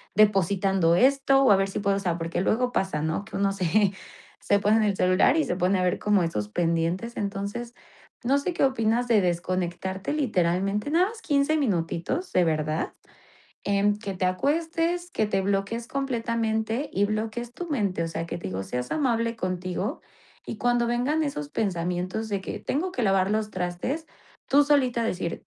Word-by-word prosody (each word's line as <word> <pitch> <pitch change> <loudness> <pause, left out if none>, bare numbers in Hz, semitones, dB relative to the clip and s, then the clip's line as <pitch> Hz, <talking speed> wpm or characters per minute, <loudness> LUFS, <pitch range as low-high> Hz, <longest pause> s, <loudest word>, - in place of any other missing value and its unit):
depositando 195 -3 +3
esto", 270 +4 +4
o 260 - +6
a - - +8
ver 195 0 +1
si 195 - -4
puedo 200 -1 +1
o - - -1
sea 175 -3 -1
porque 165 0 -3
luego 245 +6 +1
pasa, 190 -9 -1
¿no? 160 +6 -2
Que - - -10
uno 195 0 +2
se 195 +1 +2 0.5
se 205 - +2
pone 210 +2 +3
en 220 - +3
el 205 -2 +1
celular 185 +8 +3
y 315 - +3
se - - -2
pone 185 +1 +2
a - - +1
ver 180 - +1
como 205 -3 +2
esos 105 -11 -2
pendientes 170 - -1
entonces 200 +4 -4 0.5
no 270 +4 +3
sé 350 +6 -2
qué - - 0
opinas 245 -2 +2
de 225 -3 +5
desconectarte 185 +3 -2
literalmente 195 - 0
nada 350 +4 +4
más 450 +1 -9
15 285 -1 +2
minutitos 190 - -1
de 180 - +4
verdad 155 0 -1 0.7
en 205 +1 +2
que 200 -3 -5
te 185 - -1
acuestes, 330 - 0
que 215 - 0
te 195 -2 0
bloquees 200 +4 -1
completamente 230 -2 -1
y 200 +2 +2
bloquees 220 +3 -3
tu 355 - -6
mente, 205 - 0
o - - -2
sea 165 0 -4
que 170 - -5
te - - -5
digo 95 +1 -3
seas 125 +4 -4
amable 230 -5 0
contigo 185 -3 -3 0.4
y - - -6
cuando 240 0 +1
vengan 250 +6 +1
esos 150 - -4
pensamientos 180 +2 -2
de 200 -2 -1
que: - - -5
"Tengo 350 +7 -2
que 250 - -2
lavar 195 -2 +2
los 215 0 -1
trastes", 185 - -3 0.4
tú 285 +2 +5
solita 260 -5 +2
decir: 180 -6 -3
205 Hz, 185 wpm, -26 LUFS, 185-245 Hz, 0.7 s, a